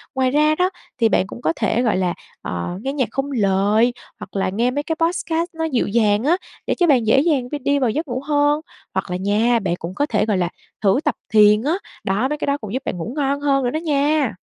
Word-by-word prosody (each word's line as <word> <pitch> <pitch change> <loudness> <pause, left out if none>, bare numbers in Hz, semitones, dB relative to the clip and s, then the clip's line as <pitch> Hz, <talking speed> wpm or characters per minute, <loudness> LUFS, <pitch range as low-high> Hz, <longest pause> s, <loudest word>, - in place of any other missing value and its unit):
Ngoài 260 -1 +2
ra 305 +2 +3
đó 360 +3 +2 0.3
thì 230 -3 +3
bạn 190 - +2
cũng - - -9
có 160 - +1
thể, 235 - 0
gọi 225 -6 +1
là, 180 -2 0 0.3
ờ, 85 -1 -4
nghe 270 +4 -3
nhạc 265 -5 0
không 275 +3 -2
lời, 210 +1 +2 0.3
hoặc - - -10
là 195 -1 0
nghe 230 +6 0
mấy 290 +3 -2
cái 320 +2 -2
podcast 330 0 -1
nó 325 0 -4
dịu 265 -7 0
dàng 210 0 +2
á 315 +6 +3 0.3
để - - +1
cho 350 - +2
bạn 250 -7 +3
dễ 225 - +5
dàng 280 -5 +1
v - - -2
đi 285 +1 +2
vào 255 -3 +2
giấc 305 +8 -2
ngủ 250 0 -3
hơn, 295 0 +2 0.3
hoặc - - -2
là 180 - -1
nha 215 +5 +2
bạn 190 -5 -1
cũng 170 - -5
có 290 - +1
thể, - - +1
gọi 210 -3 +1
là, 175 -1 0 0.3
thử 200 +5 +3
tập 295 - +1 0.2
thiền 210 0 +6
á, 300 +4 +1 0.3
đó, 205 +7 +1
mấy 300 - -2
cái - - -3
đó 280 0 +1
cũng 215 -6 -8
giúp 260 +1 -2
bạn - - -3
ngủ 195 +8 -5
ngon 280 -1 0
hơn 275 -2 +2
nữa 245 - +1
đó 310 - -2
nha. 290 - +1
255 Hz, 255 wpm, -21 LUFS, 210-290 Hz, 0.3 s, thiền